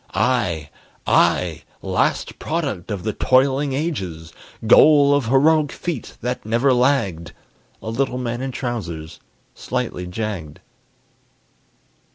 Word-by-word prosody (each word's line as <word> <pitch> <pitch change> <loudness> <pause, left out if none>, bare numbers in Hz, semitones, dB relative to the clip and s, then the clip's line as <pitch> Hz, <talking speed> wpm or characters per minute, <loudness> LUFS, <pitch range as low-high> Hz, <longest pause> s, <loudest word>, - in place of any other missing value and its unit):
I, 90 - 0 0.3
I, - - +2 0.2
last - - -1
product 140 - -3
of 100 -4 -4
the 110 - -2
toiling 135 +4 +2
ages, 95 - -4 0.3
Goal 145 +4 +6
of 145 -5 +1
heroic 145 +4 +3
feet 165 -9 -5
that 125 +2 -3
never 120 +5 +2
lagged 115 - 0 0.5
A 110 - -4
little 125 +1 -1
man 120 -1 -3
in 135 0 -3
trousers, 90 - -5 0.3
slightly 90 0 -4
jagged. 90 -6 -5
120 Hz, 110 wpm, -21 LUFS, 95-140 Hz, 0.5 s, Goal